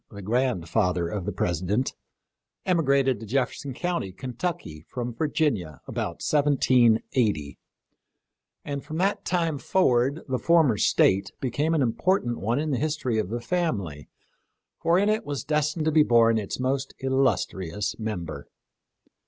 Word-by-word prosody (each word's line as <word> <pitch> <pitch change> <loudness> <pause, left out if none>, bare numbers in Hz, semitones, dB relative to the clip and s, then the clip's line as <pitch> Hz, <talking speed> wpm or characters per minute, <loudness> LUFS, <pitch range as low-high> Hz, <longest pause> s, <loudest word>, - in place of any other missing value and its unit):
t - - -15
the 100 - -7
grandfather 90 -6 0
of 95 -1 -4
the 105 - -2
President, 95 +6 -1 0.7
emi 175 -3 +2
grated 135 -3 +2
to 110 - -8
Jefferson 135 +3 -1
county, 170 - -2
Kentucky, 125 - -5
from 120 -1 -4
Virginia 130 - -1
about - - -4
1780, 120 - +2 1.1
and 140 -1 -4
from 155 +2 -6
that 195 +4 0
time 165 -5 0
forward 135 -4 +2
the 130 -2 -1
former 165 -8 +4
State 95 -1 +3
became 145 +6 0
an 145 - +2
important 120 - 0
one 115 +5 0
in 155 +1 -1
the 130 - 0
history 145 -7 -1
of 105 - -2
the 120 +2 -2
family, 115 - -2 0.7
for 170 +1 +3
in 200 +2 +3
it 215 +1 +1
was 145 -2 -4
destined 150 +1 0
to 155 - +2
be 155 0 +5
born 115 -4 +4
its 100 +2 -5
most 135 +1 -1
illustrious 105 - 0
member. 85 -10 -5
130 Hz, 145 wpm, -26 LUFS, 105-150 Hz, 1.1 s, be